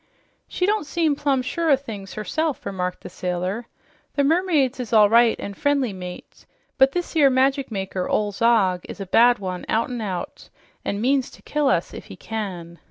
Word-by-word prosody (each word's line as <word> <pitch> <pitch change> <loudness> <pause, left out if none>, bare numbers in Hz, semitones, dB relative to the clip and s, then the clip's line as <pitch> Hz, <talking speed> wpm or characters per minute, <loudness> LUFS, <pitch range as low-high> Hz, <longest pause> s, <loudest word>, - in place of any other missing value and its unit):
"She 360 - -1
don't 415 -5 0
seem 320 -3 +1
plumb 275 -3 0
sure 330 +5 -1
o' 280 - +7
things 215 -8 -8
herself," 300 +8 -2
remarked 180 -1 -3
the - - -8
sailor. 185 +6 -3 0.5
"The 285 - +2
mermaids 305 -5 +2
is 240 -2 -5
all 210 -2 +6
right 235 0 +5
an' 200 - -5
friendly, 275 -2 0
mate, 180 -1 -10 0.3
but 265 0 +5
this 355 -1 -3
'ere 290 -4 +6
magic 265 +1 +2
maker, 190 -2 -3
ol' 210 -1 +1
Zog, 200 -4 +2
is - - -8
a 195 - -4
bad 240 +6 +5
one, 185 -2 -5
out 230 +3 0
'n' 245 -2 -4
out, 185 -5 -5 0.3
an' 200 +1 -2
means 265 +2 +1
to - - -17
kill 300 -1 0
us - - +1
if - - -9
he - - -10
can." 180 -6 -6
235 Hz, 190 wpm, -23 LUFS, 195-280 Hz, 0.5 s, o